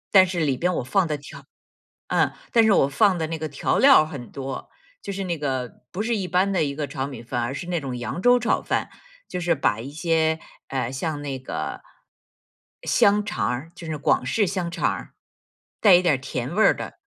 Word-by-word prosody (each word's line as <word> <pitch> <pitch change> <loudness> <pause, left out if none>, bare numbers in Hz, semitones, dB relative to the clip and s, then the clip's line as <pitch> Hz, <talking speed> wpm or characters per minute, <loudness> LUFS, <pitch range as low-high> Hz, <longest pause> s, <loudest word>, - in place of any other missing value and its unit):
但 190 - +9
是 175 -1 -3
里 140 -4 +1
边 180 +5 +1
我 - - -1
放 190 +7 +2
的 150 - -1
调 140 - -12 0.6
嗯， - - +2 0.2
但 230 - +6
是 220 - +4
我 140 -8 +4
放 185 +6 +3
的 160 -1 -2
那 165 0 -3
个 155 -1 -4
调 140 - 0
料 270 - +7
很 140 -6 -8
多， 135 -1 -6 0.3
就 200 - -5
是 195 0 -4
那 170 -3 -2
个， 130 -4 -3
不 190 - -3
是 235 0 0
一 195 - -2
般 185 +3 +2
的 180 - +2
一 140 -2 -1
个 145 -1 -3
炒 135 - -3
米 130 -5 -8
饭， 120 +1 -2
而 120 +3 -2
是 170 - -6
那 175 -3 -1
种 130 -3 -4
扬 120 +8 -4
州 245 +2 +5
炒 235 - +1
饭， - - -1 0.4
就 180 - -4
是 175 0 +2
把 110 -6 +1
一 135 - -7
些， 160 0 +1 0.3
呃， 130 -3 -2
像 145 +2 -3
那 135 -2 -3
个， 130 - -5 1.0
香 205 +1 +3
肠 210 - -2
儿， 135 +7 -4
就 175 - -10
是 155 - -3
广 140 -3 +1
式 205 - +1
香 175 -2 -2
肠 - - 0
儿， - - -6 0.7
带 200 -5 +8
一 175 - +5
点 175 -4 +3
儿 - - -3
甜 130 +4 -4
味 220 - +4
儿 - - +6
的 - - -7
160 Hz, 240 characters per minute, -24 LUFS, 135-185 Hz, 1.0 s, 但